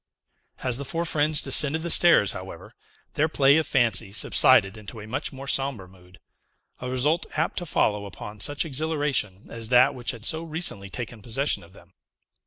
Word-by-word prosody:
As 125 -1 +1
the - - -4
four 165 +4 -3
friends 150 -2 +2
descended 150 +3 +4
the 170 - -1
stairs, 165 - +5
however, 95 0 -10 0.4
their 155 +2 0
play 140 -1 +4
of 160 -2 -1
fancy 115 -7 +1
subsided 95 0 +3
into 105 +1 -11
a 105 - -9
much 110 +4 -4
more 135 0 -10
sombre 135 -8 0
mood; 90 -1 -20 0.6
a 125 - -6
result 145 +6 0
apt 160 +4 -1
to 175 - -8
follow 105 -7 0
upon 105 +3 -10
such 145 - +1
exhilaration 145 - -2
as 115 -1 -5
that 125 0 +4
which 120 -2 -5
had 115 -3 -4
so 160 +4 -1
recently 160 - -1
taken 115 +1 -7
possession 135 +6 -1
of 85 +2 -17
them. 85 -1 -19
130 Hz, 180 wpm, -24 LUFS, 105-150 Hz, 0.6 s, stairs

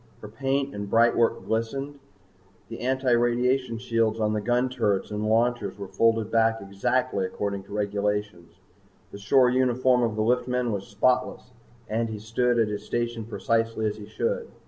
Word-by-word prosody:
Her - - -6
paint 135 +5 -2
and 100 -1 -5
brightwork 115 +1 +3
glistened. 135 +6 -3 0.7
The 115 - -7
antiradiation 125 -1 +1
shields 115 -2 0
on 105 -1 +1
the 105 - -1
gun 120 +3 +1
turrets 105 -6 -1
and 105 +1 -2
launchers 115 -2 +1
were 100 -1 -6
folded 115 +1 +1
back 115 0 +3
exactly 100 +2 -1
according 100 +1 -3
to 100 - -11
regulations. 105 -3 -2 0.6
The 100 - -9
shore 125 +5 +4
uniform 130 0 +2
of 115 -3 0
the 110 - 0
liftman 125 +1 0
was 100 -2 -4
spotless 125 +5 0 0.4
and 115 +1 -1
he 110 - -5
stood 120 +3 0
at 115 -2 +3
his 105 0 -4
station 120 0 -3
precisely 115 0 -1
as 105 0 -1
he 105 -1 -10
should. 475 - -2
115 Hz, 160 wpm, -26 LUFS, 105-125 Hz, 0.7 s, shore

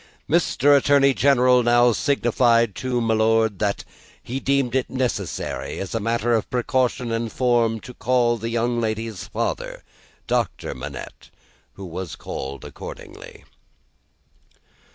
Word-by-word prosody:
Mr. 145 -3 +3
Attorney 140 -1 +4
General 125 -2 +4
now 120 0 +4
signified 120 -3 +2
to 125 +4 -2
my 115 -1 +1
Lord, 110 -2 +2
that 100 -1 -1 0.4
he 130 +3 -4
deemed 135 -3 0
it 130 -1 0
necessary, 125 -8 -3
as 95 - -5
a 115 - 0
matter 115 +2 0
of 110 - 0
precaution 125 -1 0
and 115 0 -2
form, 120 -3 +1
to 125 - -10
call 120 -1 +1
the 115 +1 -4
young 120 +1 0
lady's 110 -3 -3
father, - - -4 0.4
Doctor - - -1
Manette. 65 +2 -9 0.4
Who 95 - -9
was 90 -1 -6
called 70 +1 -7
accordingly. - - -10
120 Hz, 130 wpm, -22 LUFS, 110-125 Hz, 0.4 s, Attorney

